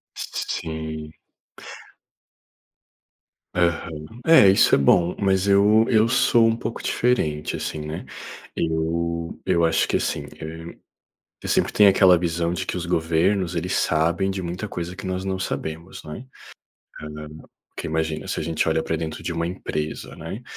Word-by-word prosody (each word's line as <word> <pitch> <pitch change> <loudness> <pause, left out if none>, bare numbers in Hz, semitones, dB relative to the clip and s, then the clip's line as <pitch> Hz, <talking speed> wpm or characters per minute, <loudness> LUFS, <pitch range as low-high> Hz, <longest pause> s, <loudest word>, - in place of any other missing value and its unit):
S - - -4
s - - 0
sim. 80 -1 -5 2.4
Aham. 85 -3 -1 0.2
É, 160 -12 +8
isso 95 - +4
é - - +8
bom, 85 +5 +3
mas 95 -1 +2
eu 105 +3 +5
eu 110 -1 +3
sou 120 -2 +4
um 115 - +2
pouco 115 0 -5
diferente, 75 -12 0
assim, 75 - -4
né. 75 +1 -5 0.5
Eu 85 +1 -2
eu 85 -3 +2
acho 80 - +2
que, - - +1
assim, - - -2
eh, 80 +1 -8 0.7
eu - - -5
sempre - - +1
tenho 105 -1 +7
aquela 95 -2 +6
visão 85 0 -1
de - - -3
que - - -3
os 85 - -4
governos 85 +2 +1
eles 90 +3 -2
sabem 85 +4 +1
de 95 -1 -4
muita 90 +4 -5
coisa 90 0 -5
que 95 0 -8
nós 95 0 -3
não 95 -1 -1
sabemos, 80 -2 -5
não 75 - -8
é? 130 - -9 0.8
Hã, 75 0 -7 0.5
porque - - -5
imagina, 80 0 -2
se - - -2
a - - -2
gente 80 0 0
olha 80 0 +1
para 80 - -2
dentro 80 -1 -5
de 85 - -3
uma 85 0 -1
empresa, 75 -4 -4
né. 90 +9 -7
85 Hz, 165 wpm, -23 LUFS, 80-95 Hz, 2.4 s, É